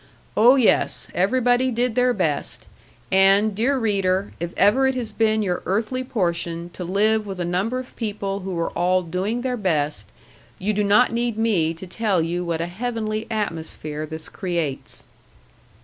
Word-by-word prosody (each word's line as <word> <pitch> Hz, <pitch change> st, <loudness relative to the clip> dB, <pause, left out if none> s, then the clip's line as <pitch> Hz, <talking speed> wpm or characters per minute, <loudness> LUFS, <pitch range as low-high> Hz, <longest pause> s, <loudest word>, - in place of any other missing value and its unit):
Oh, 240 Hz, +5 st, +7 dB
yes! 255 Hz, -5 st, +2 dB
Everybody 245 Hz, +6 st, +2 dB
did 245 Hz, 0 st, 0 dB
their 250 Hz, +1 st, +3 dB
best; 160 Hz, -10 st, -2 dB, 0.5 s
and, 195 Hz, +2 st, +5 dB
dear 250 Hz, +7 st, +1 dB
reader, 200 Hz, -4 st, 0 dB
if 170 Hz, +1 st, -3 dB
ever 230 Hz, +8 st, +4 dB
it 265 Hz, -, 0 dB
has 235 Hz, -4 st, -3 dB
been 220 Hz, 0 st, +1 dB
your 180 Hz, -3 st, -1 dB
earthly 225 Hz, +6 st, -1 dB
portion 170 Hz, -6 st, -2 dB
to 180 Hz, -, -6 dB
live 210 Hz, +4 st, +1 dB
with 190 Hz, -2 st, -6 dB
a 175 Hz, -, -1 dB
number 190 Hz, +8 st, -1 dB
of 255 Hz, 0 st, -7 dB
people 200 Hz, -3 st, -3 dB
who 190 Hz, -1 st, -5 dB
were 170 Hz, 0 st, -1 dB
all 180 Hz, +1 st, +1 dB
doing 190 Hz, +8 st, -2 dB
their 250 Hz, -1 st, -2 dB
best, 155 Hz, -8 st, -1 dB, 0.5 s
you 210 Hz, +3 st, -1 dB
do 210 Hz, 0 st, +1 dB
not 210 Hz, +5 st, +4 dB
need 235 Hz, -1 st, -1 dB
me 185 Hz, -8 st, +1 dB
to 170 Hz, -, -9 dB
tell 200 Hz, 0 st, 0 dB
you 170 Hz, +2 st, -1 dB
what 165 Hz, -2 st, -2 dB
a -, -, 0 dB
heavenly 215 Hz, +3 st, -3 dB
atmosphere 160 Hz, -7 st, -3 dB
this 160 Hz, +1 st, -3 dB
creates. 170 Hz, -7 st, -3 dB
200 Hz, 165 wpm, -23 LUFS, 175-230 Hz, 0.5 s, Oh